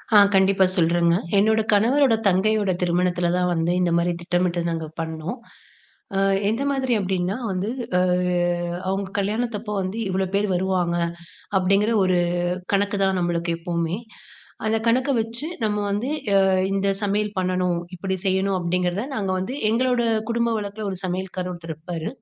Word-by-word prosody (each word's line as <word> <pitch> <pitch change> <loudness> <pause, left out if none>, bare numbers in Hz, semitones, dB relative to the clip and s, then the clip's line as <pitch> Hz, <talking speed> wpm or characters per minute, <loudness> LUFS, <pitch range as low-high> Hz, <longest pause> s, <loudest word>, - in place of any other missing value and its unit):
ஆ, - - +10 0.2
கண்டிப்பா 190 0 +4
சொல்றேங்க. 170 0 +3 0.2
என்னோட 220 +2 +4
கணவரோட, 240 +4 +4
தங்கையோட 200 +1 +2
திருமணத்ல 175 0 +1
தான் 180 0 +1
வந்து 165 0 0
இந்த 175 -1 +2
மாரி 170 +1 +1
திட்டமிட்டு 175 0 0
நாங்க 165 -1 -3
பண்ணோம். 160 +6 -4 0.8
அ, - - +3 0.3
எந்த 230 +5 -1
மாதிரி 265 -2 0
அப்டின்னா, 190 +1 -1
வந்து 190 +3 -2 0.3
அ - - +3 0.9
அவுங்க 195 0 -2
கல்யாணத்தப்போ 215 +1 -2
வந்து 190 +3 -4
இவ்ளோ 190 +1 0
பேரு 205 +1 +2
வருவாங்க 180 -1 0 0.6
அப்டிங்கிற 195 +4 +2
ஒரு 185 -1 +2 0.5
கணக்கு 200 +1 +1
தான் 190 -1 +1
நம்மளுக்கு 170 -1 -1
எப்போமே. 170 0 -2 0.7
அந்த 220 +1 +2
கணக்க 255 +4 +2
வச்சு 230 +6 -4 0.2
நம்ம 210 -1 0
வந்து, 205 +6 -1 0.3
அ, - - +7 0.3
இந்த 195 0 +1
சமையல் 205 +1 0
பண்ணணும், 180 -1 0 0.2
இப்டி 190 +2 -2
செய்யணும் 190 +1 +1
அப்டிங்கிறத 180 +2 0
நாங்க 195 -3 -1
வந்து, 190 +6 -3 0.2
எங்களோட 245 +1 +2 0.3
குடும்ப 235 0 +1
வழக்குல 205 +1 -5
ஒரு 190 - -4
சமையல்காரர் 185 0 -3
ஒருத்தர் 170 -2 -7
இருப்பாரு. 165 +2 -5
190 Hz, 145 wpm, -23 LUFS, 175-210 Hz, 0.9 s, ஆ